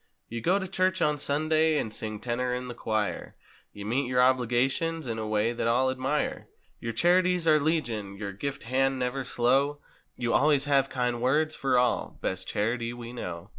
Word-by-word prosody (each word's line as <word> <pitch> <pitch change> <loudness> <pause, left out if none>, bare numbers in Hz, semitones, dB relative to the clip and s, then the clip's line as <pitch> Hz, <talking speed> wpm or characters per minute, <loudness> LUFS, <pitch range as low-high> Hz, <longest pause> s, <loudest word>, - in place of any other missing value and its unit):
You 115 0 -5
go 180 - +3
to 190 -1 -3
church 185 0 0
on 150 -3 +1
Sunday—and 155 -3 +1
sing 110 -1 -4
tenor 125 +2 -1
in 125 0 -5
the - - -5
choir. 110 -3 -2 0.4
You 100 0 -9
meet 125 +5 0
your 125 0 +1
obligations 130 +6 +2
in 115 -2 -3
a 110 - -3
w^ay 110 +2 0
that 115 - -1
all 130 +3 +3
admire. 130 +3 -2 0.3
Your 115 - -3
charities 180 +5 +2
are 155 -1 +6
legion—your 110 -10 -2
gift 140 +8 -5
hand 135 +2 +1
never 130 +1 -2
slow— 135 +4 +1 0.4
You 120 -1 -1
always 145 -1 +4
have 135 -2 +2
kind 125 -2 -1
words 155 +5 +2
for 135 -2 +1
all—best 125 -1 -1
charity 115 +2 -1
we 120 0 -8
know! 85 -8 -6
125 Hz, 170 wpm, -28 LUFS, 115-150 Hz, 0.4 s, are